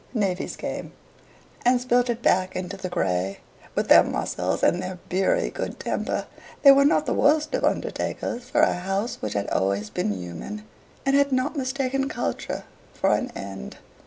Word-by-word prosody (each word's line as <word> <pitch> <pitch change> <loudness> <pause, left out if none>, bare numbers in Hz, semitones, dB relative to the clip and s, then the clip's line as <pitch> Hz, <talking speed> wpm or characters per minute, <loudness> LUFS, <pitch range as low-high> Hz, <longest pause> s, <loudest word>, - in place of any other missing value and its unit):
Navvies 195 -4 -1
came, - - -5 0.7
and 245 +1 +4
spilt 245 0 +2
it 235 0 -2
back 185 0 +2
into 185 +2 -4
the 185 -2 -5
grey. 95 - -1 0.4
With - - 0
their - - +9
muscles - - -2
and 175 - +3
their 185 0 -5
beery 195 - +1
good - - -5
temper, - - -2 0.4
they 280 - +11
were 275 0 +6
not 300 +1 +3
the 250 - 0
worst 300 - +3
of - - 0
undertakers 240 0 -1
for 300 +3 +3
a - - +4
house 195 +6 -2
which 105 -1 -3
had 100 0 -1
always 100 +2 0
been 105 - -1
human, 95 - -6 0.4
and 275 0 +3
had 280 0 +3
not 260 +4 0
mistaken 270 0 -1
culture - - -3 0.3
for - - +2
an 255 - 0
end. 95 -9 -7
215 Hz, 170 wpm, -25 LUFS, 175-270 Hz, 0.7 s, they